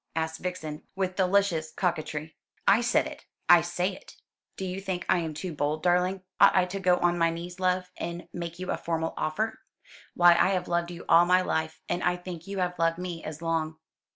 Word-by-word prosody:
asked 160 0 -2
Vixen, 160 -4 -5
with 190 -1 -1
delicious 185 -4 +2
coquetry. 155 -3 -2 0.3
"I 230 - +6
said 240 0 +2
it - - -9 0.2
I - - +8
say - - -1
it. - - -15 0.4
Do 190 - -3
you 185 +1 -4
think 190 -2 -3
I 180 - +3
am 160 -2 -4
too 175 +2 -5
bold, 150 +1 -1
darling? 180 +1 +2 0.2
Ought - - +7
I 185 -1 +4
to 190 +2 -5
go 180 -1 +3
on 175 0 +1
my 165 0 +4
knees, 175 +2 -6
love, 180 0 0
and 170 0 -5
make 170 -1 -5
you 185 0 -4
a - - -1
formal 165 -1 -2
offer? 215 +8 -2 0.6
Why 175 0 +7
I 170 - +4
have 180 -1 -1
loved 170 0 0
you 175 -1 -9
all 170 +1 +7
my 180 +1 +5
life; 160 -2 -2
and 175 - -1
I 180 0 +2
think 175 -1 -8
you 200 0 -5
have 180 -2 -1
loved 165 0 +2
me 175 -2 -5
as 155 +1 -7
long." 160 -1 -1
175 Hz, 210 wpm, -28 LUFS, 165-185 Hz, 0.6 s, I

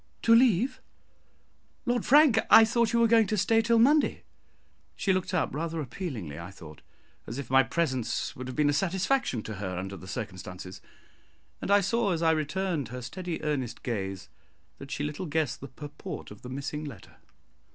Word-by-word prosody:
"To 230 - +6
leave, 235 0 +4 1.0
Lord 245 -1 0
Frank! 285 -5 +6
I 225 - +9
thought 235 0 +1
you 235 - +2
were 230 - +5
going 225 -2 +5
to 215 - -1
stay 225 +4 +3
till 230 +1 +2
Monday." 285 +6 +3 0.7
She 195 - +1
looked 185 0 -1
up 180 -3 0
rather 165 +2 -3
appealingly, 120 - -5
I 85 +2 -7
thought, 80 -5 -13 0.5
as 115 - -5
if 140 -3 -6
my 135 0 +7
presence 130 -5 -1
would 130 0 -7
have 130 - -6
been 150 -1 +3
a - - -1
satisfaction 190 - 0
to 110 -2 -6
her 95 -2 -4
under 95 +2 -5
the 95 - -11
circumstances; 90 -2 -7 0.8
and - - -4
I 200 0 +6
saw, 205 0 +1
as 165 0 -2
I 160 - +5
returned 160 - -1
her 125 +1 -7
steady 175 +4 -5
earnest 140 -6 -2
gaze, 95 -5 -4 0.5
that 140 - -9
she 145 - -3
little 150 +4 -4
guessed 150 -3 -1
the 140 - -7
purport 145 -1 -8
of 105 - -12
the 125 - -9
missing 140 +3 -4
letter. 120 - -10
150 Hz, 185 wpm, -28 LUFS, 120-200 Hz, 1.0 s, I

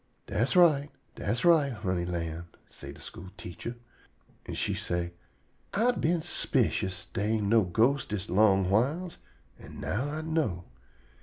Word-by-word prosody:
"Das 115 - 0
right; 150 -5 +5 0.2
das 115 +8 -2
right, 155 -6 +5
honey 95 -5 -1
lamb," 85 -1 -4 0.2
say 70 - -8
de - - -13
school 90 +2 -9
teacher. 90 +7 -6 0.7
An' - - -4
she - - 0
say: 85 0 -2 0.6
"I 230 +5 +4
been 170 -7 +1
s'picious 110 - 0
dey 105 +3 -1
ain' 105 -2 0
no 115 0 +6
ghostes 120 +10 +2
dis 105 -2 -3
long 95 -1 +4
whiles, 150 - +1 0.4
an' - - -11
now 130 +9 -1
I 155 +1 -3
know. 155 - -1
110 Hz, 145 wpm, -29 LUFS, 90-145 Hz, 0.7 s, no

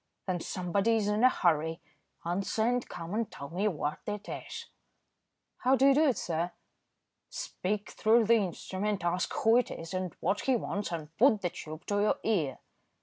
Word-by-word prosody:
"Then 185 -2 -1
somebody 195 +6 0
is 215 -2 +1
in 210 +3 +1
a 255 - +8
hurry. 160 -5 +1 0.5
Answer 195 +5 0
and 245 +1 0
come 170 +1 -6
and 220 0 -1
tell 140 +1 -8
me 190 +5 0
what 150 -6 -2
it 210 -1 -4
is." - - -6 0.9
"How 260 +2 +3
do 270 - +3
you - - +6
do 305 +3 +4
it, 260 - +2
sir?" 170 +1 -2 0.8
"Speak 210 - -3
through 225 +1 +4
the 230 - +5
instrument, 200 -1 -1
ask 175 +1 0
who 225 +1 +4
it 250 - +2
is, 165 +2 -7
and 185 -2 -3
what 195 +4 0
he 265 - +2
wants, 205 -4 -2
and 160 -2 -6
put 225 -4 +5
the 175 - 0
tube 155 +1 -8
to 205 0 0
your 215 +7 +2
ear." 165 - 0
200 Hz, 185 wpm, -30 LUFS, 170-225 Hz, 0.9 s, a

